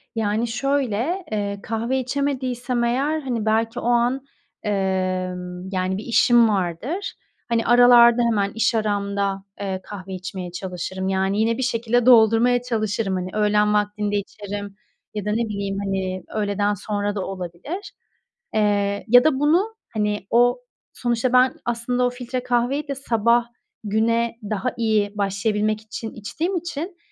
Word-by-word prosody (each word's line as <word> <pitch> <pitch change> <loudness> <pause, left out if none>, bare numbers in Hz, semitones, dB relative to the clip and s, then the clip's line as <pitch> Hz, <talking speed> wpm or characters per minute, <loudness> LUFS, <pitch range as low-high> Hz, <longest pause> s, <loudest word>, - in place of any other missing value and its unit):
Yani, 220 +1 0
şöyle, 275 - -1
eee, 200 -1 -2
kahve 230 +4 -1
içemediysem 255 -2 -1
eğer, 275 +6 0
hani, 240 -6 -2
belki 225 +2 +1
o - - -7
an, 245 +2 +2 0.4
emm, 185 -2 -2
yani, 185 0 -1
bir 205 - -6
işim 235 0 +4
vardır. 210 - -2 0.3
Hani, 230 -1 +1
aralarda 240 0 +7
hemen, 205 -4 +1
iş 230 +1 +2
aramda, 200 -2 -1 0.2
eee, 190 -2 -3
kahve 190 -2 -8
içmeye 185 -1 -6
çalışırım. 185 +1 -4
Yani, 190 +1 0
yine 225 +1 +2
bir 260 - -1
şekilde 235 -1 +1
doldurmaya 240 0 +5
çalışırım. 215 -4 -1
Hani, 185 0 -3
öğlen 210 0 +2
vaktinde 210 0 0
içerim 205 0 -5 0.4
ya 210 -2 -4
da 210 - 0
ne 215 - +1
bileyim, 200 -1 -3
hani, 190 -1 -2
öğleden 205 -1 0
sonra 205 +1 -2
da 195 - -2
olabilir. 190 - -6 0.6
Eee, 205 -1 +1
ya 245 +2 +7
da 295 -4 +2
bunu, 350 +10 +2 0.2
hani, 210 -2 -1
o, 245 - +3 0.3
sonuçta 240 +1 -1
ben 255 +1 +5
aslında 240 +1 0
o - - +2
filtre 250 0 -5
kahveyi 255 +4 0
de 275 - -3
sabah 235 -2 +2 0.4
güne 230 +2 +1
daha 215 +4 -1
iyi 215 -3 +1
başlayabilmek 210 +2 0
için 220 +1 -7
içtiğim 320 - -3
için, 345 +1 -5
220 Hz, 140 wpm, -22 LUFS, 200-245 Hz, 0.6 s, aralarda